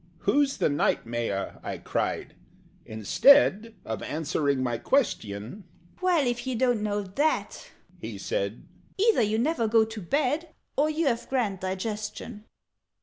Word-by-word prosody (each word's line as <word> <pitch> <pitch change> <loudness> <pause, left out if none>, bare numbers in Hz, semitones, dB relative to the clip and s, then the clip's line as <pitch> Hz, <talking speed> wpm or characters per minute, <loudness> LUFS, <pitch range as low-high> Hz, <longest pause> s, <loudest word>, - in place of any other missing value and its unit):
"Who's 285 -1 +2
the - - +2
Knight 145 -4 +1
Mayor?" 115 -4 -3
I - - -5
cried. - - -2 0.5
Instead 220 - +4
Of 110 -2 -4
answering 145 -3 -1
my 120 -2 -1
question, 115 - -1 0.4
"Well! 355 -6 +3
If 240 +1 -2
you 260 - -1
don't 245 -2 +2
know 205 -1 -1
that," 285 +12 -1 0.3
he - - -6
said, - - -3 0.3
"Either 430 - +4
you 215 0 +1
never 240 -1 +1
go 220 0 +4
to 220 -1 -7
bed, 295 - -1 0.2
Or 295 +2 +2
you've 300 -7 0
a - - -26
grand 225 -8 0
digestion! 210 +3 -5
225 Hz, 140 wpm, -27 LUFS, 170-275 Hz, 0.5 s, Instead